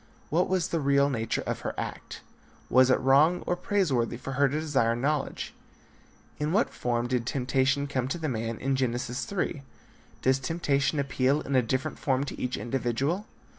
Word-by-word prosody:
What 175 Hz, +4 st, +2 dB
was 185 Hz, -1 st, +1 dB
the 165 Hz, -, 0 dB
real 140 Hz, 0 st, +3 dB
nature 115 Hz, -4 st, -1 dB
of -, -, -2 dB
her -, -, -4 dB
act? -, -, -6 dB, 0.5 s
Was 130 Hz, 0 st, +6 dB
it 130 Hz, -, +4 dB
wrong 145 Hz, +7 st, +4 dB
or 175 Hz, -, +1 dB
praise 185 Hz, -3 st, 0 dB
worthy 120 Hz, -1 st, 0 dB
for 135 Hz, -, -6 dB
her 140 Hz, +1 st, +3 dB
to 150 Hz, +3 st, -1 dB
desire 135 Hz, -7 st, +1 dB
knowledge? 140 Hz, +3 st, -2 dB, 0.9 s
In 150 Hz, +1 st, 0 dB
what 210 Hz, +6 st, +2 dB
form 120 Hz, -1 st, -1 dB
did 120 Hz, -1 st, -1 dB
temptation 135 Hz, +2 st, +1 dB
come 130 Hz, -3 st, -1 dB
to 140 Hz, -, -2 dB
the 160 Hz, -2 st, -3 dB
man 115 Hz, -3 st, -2 dB
in 135 Hz, +3 st, 0 dB
Genesis 125 Hz, -1 st, -1 dB
3. 175 Hz, -6 st, -2 dB, 0.6 s
Does 130 Hz, +1 st, +3 dB
temptation 140 Hz, -1 st, 0 dB
appeal 140 Hz, +1 st, +1 dB
in 140 Hz, -, -2 dB
a 130 Hz, -, +6 dB
different 130 Hz, +2 st, -2 dB
form 135 Hz, -1 st, +1 dB
to 145 Hz, -, -6 dB
each 125 Hz, 0 st, -1 dB
individual? 135 Hz, -, -1 dB
135 Hz, 180 wpm, -28 LUFS, 125-150 Hz, 0.9 s, Was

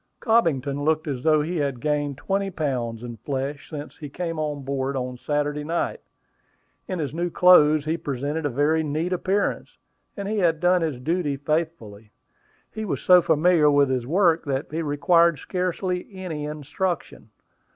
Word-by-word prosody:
Cobbington 145 Hz, -, +1 dB
looked 155 Hz, +1 st, +1 dB
as 135 Hz, -4 st, -3 dB
though 155 Hz, 0 st, +3 dB
he 170 Hz, +3 st, -3 dB
had 140 Hz, -4 st, -1 dB
gained 145 Hz, -1 st, -1 dB
twenty 195 Hz, +5 st, -1 dB
pounds 125 Hz, -9 st, -3 dB
in 120 Hz, -1 st, -7 dB
flesh 140 Hz, +5 st, -4 dB
since 150 Hz, -1 st, -8 dB
he 150 Hz, -, -8 dB
came 165 Hz, +1 st, -4 dB
on 150 Hz, -2 st, -3 dB
board 135 Hz, 0 st, -2 dB
on 125 Hz, -1 st, -3 dB
Saturday 145 Hz, +1 st, -1 dB
night. 165 Hz, +3 st, -2 dB, 0.9 s
In 185 Hz, -, -3 dB
his 150 Hz, -4 st, -3 dB
new 175 Hz, +2 st, -1 dB
clothes 155 Hz, -4 st, +5 dB
he 160 Hz, +2 st, 0 dB
presented 145 Hz, +2 st, -3 dB
a 145 Hz, -, 0 dB
very 145 Hz, +5 st, +2 dB
neat 160 Hz, +4 st, -2 dB
appearance; 190 Hz, +3 st, -1 dB, 0.4 s
and 200 Hz, -1 st, -4 dB
he 215 Hz, 0 st, -1 dB
had 165 Hz, -4 st, +2 dB
done 180 Hz, +1 st, +3 dB
his 155 Hz, -6 st, -2 dB
duty 155 Hz, 0 st, -1 dB
faithfully. 145 Hz, -9 st, -3 dB, 0.6 s
He 220 Hz, -, -5 dB
was 210 Hz, -, -2 dB
so 180 Hz, -1 st, +7 dB
familiar 160 Hz, -1 st, +4 dB
with 145 Hz, -2 st, +3 dB
his 125 Hz, -2 st, -1 dB
work, 170 Hz, 0 st, +3 dB
that 140 Hz, 0 st, -3 dB
he 160 Hz, +2 st, -2 dB
required 165 Hz, +2 st, +3 dB
scarcely 180 Hz, +3 st, -2 dB
any 180 Hz, -6 st, -5 dB
instruction. 155 Hz, +4 st, -4 dB
155 Hz, 165 wpm, -24 LUFS, 140-175 Hz, 0.9 s, so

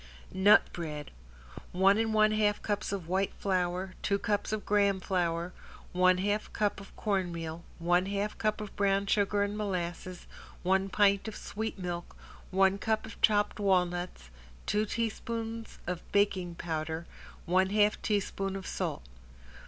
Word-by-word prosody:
~NUT 190 Hz, +3 st, +5 dB
BREAD~ 150 Hz, -4 st, -5 dB, 0.6 s
One 195 Hz, +3 st, +5 dB
and 225 Hz, 0 st, +1 dB
one 215 Hz, 0 st, +4 dB
half 210 Hz, -1 st, +2 dB
cups 205 Hz, -2 st, -1 dB
of 190 Hz, -5 st, -4 dB
white 190 Hz, +2 st, 0 dB
flour, 185 Hz, -1 st, -1 dB
two 200 Hz, -, +1 dB
cups 205 Hz, +1 st, -1 dB
of 215 Hz, -2 st, -2 dB
graham 200 Hz, -2 st, +3 dB
flour, 175 Hz, -1 st, -1 dB, 0.4 s
one 185 Hz, 0 st, +4 dB
half 205 Hz, +3 st, -1 dB
cup 205 Hz, -2 st, 0 dB
of 195 Hz, -, -14 dB
cornmeal, 170 Hz, -5 st, -2 dB
one 175 Hz, +2 st, +2 dB
half 200 Hz, +1 st, -2 dB
cup 215 Hz, 0 st, 0 dB
of 210 Hz, -, -7 dB
brown 200 Hz, 0 st, +2 dB
sugar 205 Hz, 0 st, +2 dB
and 205 Hz, 0 st, -2 dB
molasses, 185 Hz, -3 st, -3 dB, 0.4 s
one 190 Hz, +2 st, +2 dB
pint 200 Hz, 0 st, +3 dB
of 220 Hz, -, -5 dB
sweet 220 Hz, +1 st, -4 dB
milk, 175 Hz, -2 st, -5 dB, 0.3 s
one 190 Hz, +1 st, +3 dB
cup 220 Hz, +2 st, 0 dB
of 220 Hz, -, -11 dB
chopped 210 Hz, -1 st, +3 dB
walnuts, 180 Hz, -, 0 dB, 0.3 s
two 210 Hz, +1 st, +1 dB
teaspoons 230 Hz, 0 st, -3 dB
of 180 Hz, -1 st, -5 dB
baking 190 Hz, -4 st, +1 dB
powder, 160 Hz, 0 st, -3 dB, 0.4 s
one 185 Hz, +2 st, +3 dB
half 210 Hz, +1 st, +3 dB
teaspoon 195 Hz, -2 st, -1 dB
of 195 Hz, -1 st, -6 dB
salt. -, -, -3 dB
195 Hz, 145 wpm, -30 LUFS, 180-210 Hz, 0.6 s, ~NUT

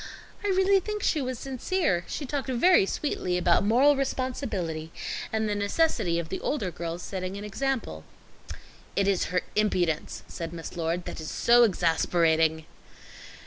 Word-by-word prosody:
I -, -, -1 dB
really 385 Hz, 0 st, +4 dB
think 420 Hz, +2 st, -4 dB
she 305 Hz, -, +2 dB
was 255 Hz, -1 st, -3 dB
sincere. 260 Hz, -, -1 dB
She 290 Hz, -, -4 dB
talked 275 Hz, +1 st, -3 dB
very 260 Hz, -, +4 dB
sweetly 185 Hz, -11 st, -1 dB
about 175 Hz, +1 st, +3 dB
moral 255 Hz, +8 st, +5 dB
responsibility, 225 Hz, -, -3 dB, 0.4 s
and 220 Hz, 0 st, 0 dB
the 210 Hz, -, 0 dB
necessity 205 Hz, -, +1 dB
of 170 Hz, -1 st, -3 dB
the -, -, -3 dB
older 205 Hz, -11 st, -2 dB
girls 170 Hz, +1 st, -5 dB
setting 185 Hz, 0 st, -4 dB
an 200 Hz, -, -7 dB
example." 210 Hz, -, -3 dB, 0.9 s
"It 200 Hz, 0 st, +2 dB
is 195 Hz, -2 st, +2 dB
her 180 Hz, 0 st, 0 dB
impudence," 180 Hz, -7 st, 0 dB
said 165 Hz, 0 st, -6 dB
Miss 165 Hz, +1 st, -7 dB
Lord, 170 Hz, +1 st, -2 dB
"that -, -, -6 dB
is 155 Hz, -, -5 dB
so 240 Hz, +1 st, +4 dB
exasperating." 165 Hz, -5 st, +2 dB
200 Hz, 150 wpm, -27 LUFS, 170-270 Hz, 0.9 s, moral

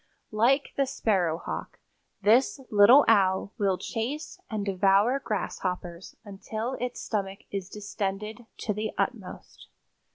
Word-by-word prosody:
Like 245 Hz, +6 st, +2 dB
the 275 Hz, -1 st, +2 dB
sparrowhawk, 180 Hz, -10 st, -1 dB, 0.5 s
this 240 Hz, +7 st, +4 dB
little 220 Hz, +7 st, +7 dB
Owl 195 Hz, -2 st, +3 dB
will 195 Hz, -3 st, +2 dB
chase 270 Hz, -, -4 dB
and 215 Hz, -4 st, -3 dB
devour 200 Hz, +6 st, +3 dB
grasshoppers 180 Hz, -6 st, -4 dB
until 215 Hz, +4 st, -5 dB
its 250 Hz, 0 st, -3 dB
stomach 195 Hz, -3 st, -3 dB
is 195 Hz, -2 st, -4 dB
distended 210 Hz, +2 st, -5 dB
to 210 Hz, -, -1 dB
the 215 Hz, +1 st, -3 dB
utmost." -, -, -4 dB
210 Hz, 110 wpm, -27 LUFS, 195-230 Hz, 0.5 s, little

